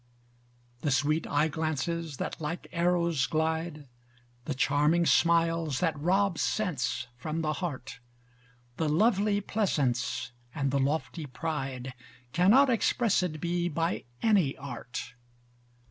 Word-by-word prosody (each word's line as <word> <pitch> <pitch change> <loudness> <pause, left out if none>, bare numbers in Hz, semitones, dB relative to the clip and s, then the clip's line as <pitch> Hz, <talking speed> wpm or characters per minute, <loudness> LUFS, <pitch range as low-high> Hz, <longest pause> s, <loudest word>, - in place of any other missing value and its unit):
The 145 - -1
sweet 145 +4 +1
eye 150 +2 +2
glances, 160 0 -2
that - - -4
like 160 +3 -4
arrows 170 -5 +1
glide, 160 -1 -1 0.6
The 150 - -2
charming 150 +5 +3
smiles, 165 -4 +3
that 165 -3 +1
rob 190 +3 +2
sense 165 - -1
from 155 +5 -3
the 155 0 0
heart: 130 -8 -5 0.8
The 160 -2 0
lovely 205 +4 +3
pleasance 140 - 0 0.2
and 140 -3 0
the 140 - +1
lofty 150 +3 -1
pride, 135 -2 -4 0.4
Cannot 210 - +6
expressed 200 -8 +1
be 175 +2 0
by 165 +2 -1 0.2
any 195 -11 +3
art. 125 -2 -7
160 Hz, 115 wpm, -29 LUFS, 140-175 Hz, 0.8 s, Cannot